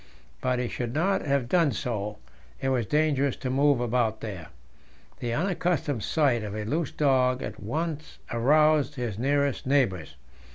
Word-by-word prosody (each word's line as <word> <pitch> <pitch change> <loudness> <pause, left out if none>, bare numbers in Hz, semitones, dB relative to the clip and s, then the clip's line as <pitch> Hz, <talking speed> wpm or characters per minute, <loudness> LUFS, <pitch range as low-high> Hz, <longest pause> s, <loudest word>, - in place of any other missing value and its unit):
But 125 0 +1
he 125 0 -1
should 120 +1 -4
not 185 +1 +1
have 140 -3 +1
done 165 0 +3
so; 105 -2 -3 0.4
it 135 - -1
was 125 -5 0
dangerous 145 -2 +1
to 130 -1 -4
move 140 0 +3
about 120 -2 0
here. 95 -8 -6 0.7
The 120 - -3
unaccustomed 160 - 0
sight 140 -7 +2
of 105 -1 -5
a 105 -1 -3
loose 155 +7 -1
dog 130 -4 +2
at - - -6
once 155 +7 -4
aroused 150 +4 +3
his 120 -5 -4
nearest 140 +1 0
neighbours. 120 - +1
130 Hz, 155 wpm, -27 LUFS, 120-150 Hz, 0.7 s, done